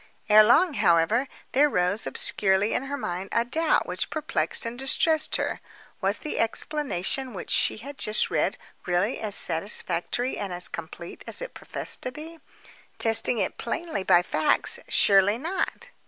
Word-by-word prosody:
Ere 215 Hz, +1 st, +8 dB
long, 300 Hz, +10 st, +4 dB
however, 175 Hz, +8 st, +2 dB, 0.2 s
there 290 Hz, +3 st, +4 dB
rose 180 Hz, -1 st, 0 dB
obscurely 195 Hz, +1 st, +2 dB
on 265 Hz, -, -2 dB
her 285 Hz, +1 st, -4 dB
mind 185 Hz, -5 st, -5 dB
a 235 Hz, -, +1 dB
doubt 315 Hz, +6 st, +1 dB
which -, -, -3 dB
perplexed 295 Hz, -, 0 dB
and 235 Hz, +2 st, -6 dB
distressed 310 Hz, +4 st, +2 dB
her. -, -, -2 dB, 0.4 s
Was -, -, 0 dB
the 305 Hz, -, -5 dB
explanation 260 Hz, -, -2 dB
which 185 Hz, -, -7 dB
she -, -, +2 dB
had 275 Hz, +6 st, -10 dB
just 215 Hz, 0 st, +1 dB
read -, -, 0 dB, 0.3 s
really 180 Hz, +7 st, 0 dB
as 210 Hz, -2 st, -2 dB
satisfactory 180 Hz, +7 st, 0 dB
and 200 Hz, -2 st, -4 dB
as 180 Hz, 0 st, -1 dB
complete 170 Hz, +1 st, -9 dB
as -, -, 0 dB
it -, -, -7 dB
professed -, -, -4 dB
to 255 Hz, -, -2 dB
be? 320 Hz, +4 st, -10 dB, 0.6 s
Testing 225 Hz, +1 st, +4 dB
it -, -, -2 dB
plainly 335 Hz, -, -4 dB
by 175 Hz, -1 st, +4 dB
facts, -, -, 0 dB
surely 200 Hz, +1 st, +3 dB
not. 335 Hz, +9 st, -4 dB
225 Hz, 155 wpm, -25 LUFS, 185-285 Hz, 0.6 s, Ere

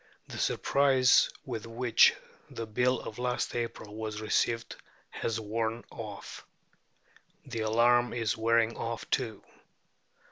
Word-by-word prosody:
The -, -, -6 dB
surprise 135 Hz, -2 st, +4 dB, 0.2 s
with 115 Hz, -4 st, -5 dB
which 115 Hz, 0 st, +4 dB, 0.3 s
the 115 Hz, -, -5 dB
Bill 125 Hz, +4 st, +1 dB
of 110 Hz, -, -8 dB
last 125 Hz, 0 st, -1 dB
April 115 Hz, -3 st, -4 dB
was 110 Hz, -1 st, -4 dB
received 115 Hz, +1 st, 0 dB, 0.4 s
has 115 Hz, 0 st, -2 dB
worn 110 Hz, +2 st, -2 dB
off. 105 Hz, -3 st, -8 dB, 1.0 s
The 125 Hz, -4 st, -5 dB
alarm 120 Hz, +2 st, +3 dB
is 115 Hz, -2 st, -1 dB
wearing 115 Hz, 0 st, +2 dB
off 115 Hz, 0 st, -4 dB
too. 115 Hz, -6 st, -1 dB
115 Hz, 115 wpm, -30 LUFS, 110-120 Hz, 1.0 s, surprise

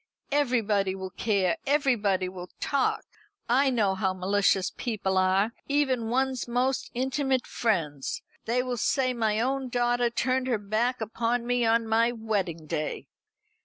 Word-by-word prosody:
"Everybody 220 Hz, -9 st, +1 dB
will 190 Hz, -1 st, -6 dB
care 195 Hz, -5 st, +1 dB
everybody 230 Hz, -10 st, +2 dB
will 180 Hz, -1 st, -8 dB
talk. 275 Hz, -3 st, 0 dB, 0.4 s
I 270 Hz, +4 st, +3 dB
know 215 Hz, -6 st, +2 dB
how 190 Hz, -1 st, -1 dB
malicious 195 Hz, 0 st, +2 dB
people 200 Hz, -5 st, -2 dB
are, 190 Hz, +3 st, +3 dB, 0.2 s
even 265 Hz, -5 st, +1 dB
one's 260 Hz, 0 st, 0 dB
most 250 Hz, +2 st, 0 dB
intimate 265 Hz, 0 st, 0 dB
friends. 155 Hz, -, -1 dB, 0.2 s
They 245 Hz, +2 st, +1 dB
will 250 Hz, -1 st, -3 dB
say 255 Hz, +3 st, +1 dB
my 220 Hz, -3 st, 0 dB
own 265 Hz, +2 st, -1 dB
daughter 240 Hz, 0 st, +1 dB
turned 255 Hz, +2 st, 0 dB
her 245 Hz, -3 st, +1 dB
back 220 Hz, +5 st, -1 dB
upon 230 Hz, +2 st, -1 dB
me 245 Hz, 0 st, +1 dB
on 230 Hz, 0 st, +2 dB
my 230 Hz, +2 st, +3 dB
wedding 200 Hz, -8 st, -2 dB
day." 155 Hz, -1 st, -4 dB
230 Hz, 140 wpm, -27 LUFS, 195-255 Hz, 0.4 s, I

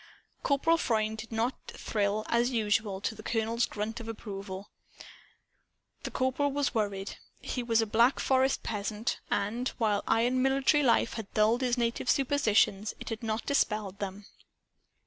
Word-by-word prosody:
Corporal 325 Hz, +4 st, +2 dB
Freund 220 Hz, -3 st, 0 dB
did 230 Hz, +1 st, -8 dB
not 230 Hz, +3 st, 0 dB
thrill, 210 Hz, 0 st, -1 dB
as 235 Hz, +1 st, +2 dB
usual, 210 Hz, -4 st, 0 dB
to 220 Hz, -, -1 dB
the 215 Hz, -, -10 dB
colonel's 225 Hz, +1 st, 0 dB
grunt 215 Hz, +2 st, -4 dB
of 230 Hz, -, -8 dB
approval. 200 Hz, -3 st, -7 dB, 1.3 s
The -, -, -4 dB
Corporal 260 Hz, +2 st, 0 dB
was 285 Hz, 0 st, 0 dB
worried. 200 Hz, -3 st, -2 dB, 0.2 s
He 250 Hz, -, -3 dB
was 230 Hz, -1 st, +2 dB
a -, -, -1 dB
Black 230 Hz, +5 st, +3 dB
Forest 265 Hz, 0 st, +2 dB
peasant; 210 Hz, +1 st, -2 dB
and, 225 Hz, +5 st, -1 dB
while 210 Hz, -4 st, +1 dB
iron 245 Hz, +3 st, +2 dB
military 270 Hz, +3 st, +3 dB
life 235 Hz, -3 st, +3 dB
had 220 Hz, -3 st, -6 dB
dulled 220 Hz, +4 st, +3 dB
his 250 Hz, -1 st, +1 dB
native 235 Hz, +1 st, -1 dB
superstitions, 220 Hz, -7 st, +2 dB
it -, -, -7 dB
had 225 Hz, 0 st, -4 dB
not 220 Hz, 0 st, -2 dB
dispelled 210 Hz, -8 st, 0 dB
them. 200 Hz, 0 st, -5 dB
225 Hz, 150 wpm, -30 LUFS, 210-250 Hz, 1.3 s, Black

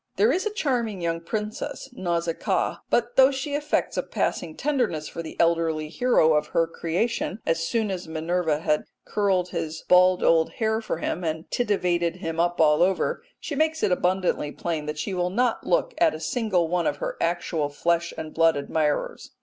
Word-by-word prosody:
There 210 Hz, +5 st, +4 dB
is 375 Hz, +8 st, 0 dB
a 425 Hz, -, -4 dB
charming 240 Hz, -, -1 dB
young 165 Hz, -1 st, -2 dB
princess, 215 Hz, +7 st, -4 dB
Nausicaa, 170 Hz, -6 st, -1 dB
but 240 Hz, 0 st, 0 dB
though 265 Hz, 0 st, +8 dB
she 280 Hz, +2 st, -4 dB
affects 295 Hz, +1 st, -1 dB
a -, -, +3 dB
passing 160 Hz, -2 st, -2 dB
tenderness 245 Hz, -, 0 dB
for 170 Hz, -, -6 dB
the 160 Hz, -, -9 dB
elderly 165 Hz, -2 st, +1 dB
hero 170 Hz, -6 st, +3 dB
of 150 Hz, 0 st, +1 dB
her 165 Hz, -, +5 dB
creation 180 Hz, +6 st, -2 dB
as 165 Hz, 0 st, +1 dB
soon 220 Hz, -1 st, 0 dB
as 180 Hz, -3 st, -5 dB
Minerva 160 Hz, -1 st, -1 dB
has 150 Hz, -2 st, +2 dB, 0.3 s
curled 190 Hz, -3 st, +1 dB
his 160 Hz, -2 st, -4 dB
bald 180 Hz, 0 st, +5 dB
old 165 Hz, -1 st, +3 dB
hair 220 Hz, 0 st, 0 dB
for 220 Hz, -, -3 dB
him 175 Hz, +2 st, -3 dB
and 160 Hz, 0 st, -3 dB
tittivated 180 Hz, -7 st, +1 dB
him 165 Hz, -2 st, -4 dB
up 175 Hz, +1 st, +1 dB
all 150 Hz, -1 st, +5 dB
over, 190 Hz, -, +1 dB, 0.2 s
she -, -, -5 dB
makes 315 Hz, +2 st, 0 dB
it -, -, +3 dB
abundantly 180 Hz, -4 st, +1 dB
plain 160 Hz, -3 st, -3 dB
that 150 Hz, 0 st, -4 dB
she 195 Hz, -, -3 dB
will 180 Hz, -1 st, 0 dB
not 235 Hz, +5 st, 0 dB
look -, -, +1 dB
at 335 Hz, -2 st, +4 dB
a -, -, -7 dB
single 210 Hz, -9 st, 0 dB
one 175 Hz, 0 st, 0 dB
of 145 Hz, -, -1 dB
her -, -, -3 dB
actual 165 Hz, -3 st, -1 dB
flesh 170 Hz, +3 st, 0 dB
and 155 Hz, -1 st, -6 dB
blood 165 Hz, -1 st, +4 dB
admirers. 150 Hz, +1 st, -1 dB
175 Hz, 185 wpm, -25 LUFS, 165-220 Hz, 0.3 s, though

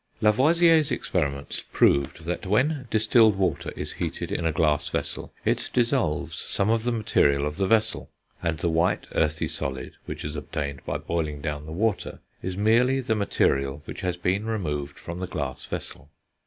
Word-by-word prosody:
Lavoisier's 155 Hz, +7 st, +4 dB
experiments 70 Hz, -, -1 dB
proved 70 Hz, +3 st, +2 dB
that 90 Hz, +2 st, -3 dB
when 130 Hz, +6 st, +1 dB
distilled 110 Hz, 0 st, +4 dB
water 95 Hz, -3 st, -1 dB
is -, -, -3 dB
heated -, -, -4 dB
in 85 Hz, -, 0 dB
a -, -, +2 dB
glass 75 Hz, -2 st, +1 dB
vessel, -, -, -3 dB
it -, -, +1 dB
dissolves 120 Hz, -, +1 dB
some 100 Hz, +3 st, 0 dB
of 115 Hz, -1 st, +2 dB
the 120 Hz, +2 st, 0 dB
material 70 Hz, -11 st, +2 dB
of 75 Hz, 0 st, -3 dB
the 95 Hz, -1 st, +1 dB
vessel, 110 Hz, +1 st, +1 dB, 0.3 s
and 85 Hz, -2 st, -1 dB
the 80 Hz, -, -1 dB
white, 85 Hz, +2 st, +1 dB
earthy 80 Hz, 0 st, +1 dB
solid 65 Hz, -1 st, -3 dB, 0.2 s
which -, -, -5 dB
is 75 Hz, +1 st, -4 dB
obtained 70 Hz, -2 st, -4 dB
by -, -, -1 dB
boiling 80 Hz, -3 st, -2 dB
down 75 Hz, 0 st, -4 dB
the -, -, -7 dB
water 105 Hz, +4 st, -1 dB, 0.2 s
is 95 Hz, 0 st, -4 dB
merely 120 Hz, +6 st, +3 dB
the 125 Hz, -4 st, 0 dB
material 70 Hz, -9 st, +1 dB
which -, -, -7 dB
has 90 Hz, -1 st, -1 dB
been 95 Hz, +4 st, 0 dB
removed 75 Hz, -10 st, -3 dB
from 85 Hz, +1 st, -7 dB
the 95 Hz, -, -3 dB
glass 65 Hz, -7 st, -4 dB
vessel. 70 Hz, -, -6 dB
90 Hz, 170 wpm, -26 LUFS, 75-110 Hz, 0.3 s, Lavoisier's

